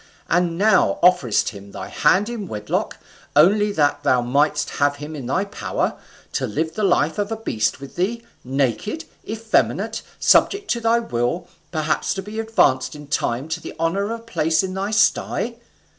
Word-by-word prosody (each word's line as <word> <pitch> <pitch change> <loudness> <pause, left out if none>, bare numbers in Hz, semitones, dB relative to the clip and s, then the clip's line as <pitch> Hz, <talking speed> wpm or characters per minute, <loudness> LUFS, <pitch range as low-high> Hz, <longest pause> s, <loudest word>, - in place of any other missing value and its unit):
and 170 -1 +1
now 200 - +4
offerest 175 - +4
him 100 -1 -12
thy 95 - -6
hand 195 - +2
in 230 -5 -5
wedlock, 105 -7 -3 0.4
only 205 +7 +5
that 145 -5 +1
thou 130 -3 +3
mightest 145 +5 +1
have 145 0 +3
him 150 +2 -7
in 135 -5 -6
thy 190 +10 0
power, 200 - -2 0.4
to - - -1
live 160 +8 -2
the 215 - -4
life 175 -4 +2
of 205 +1 -1
a - - 0
beast 115 - -1
with 140 0 -10
thee, 225 +6 -1 0.2
naked, 135 - -1 0.2
effeminate, 220 0 0 0.2
subject 400 0 +3
to 235 - 0
thy 230 +1 +3
will, 170 - -2 0.2
perhaps 155 -1 0
to 190 - -4
be 210 +3 -6
advanced 135 -12 +2
in 150 0 -10
time 135 -1 -1
to 165 +1 -3
the - - -8
honour 170 +5 0
of 230 0 -4
a - - -20
place 165 -7 +1
in 185 -1 -3
thy 195 +2 -2
sty. 220 +2 +1
165 Hz, 175 wpm, -22 LUFS, 140-210 Hz, 0.4 s, only